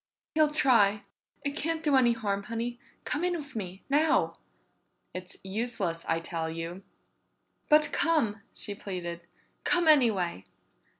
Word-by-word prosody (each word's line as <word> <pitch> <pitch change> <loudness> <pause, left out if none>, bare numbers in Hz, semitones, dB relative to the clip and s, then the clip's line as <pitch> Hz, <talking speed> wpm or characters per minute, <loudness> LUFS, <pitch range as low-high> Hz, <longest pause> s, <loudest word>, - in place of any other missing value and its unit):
"He'll 310 -1 +4
try. 230 -9 +4 0.4
It 285 0 -1
can't 320 +1 -2
do 295 -3 +3
any 245 -3 +5
harm, 205 -3 -2
Honey. 235 +2 -4 0.3
Come 300 - -1
in 355 -1 +1
with 290 -5 -9
me. 190 -3 -5
Now!" 300 +3 +3 0.8
"It's 185 0 -7
useless, 195 -4 -2
I 165 - +2
tell 165 -1 -3
you!" 165 +3 -5 0.9
"But 300 0 +5
come," 230 -11 +1
she 205 - -3
pleaded. 180 -4 -5 0.4
"Come 350 -2 +2
anyway!" 215 - +4
230 Hz, 130 wpm, -29 LUFS, 185-295 Hz, 0.9 s, any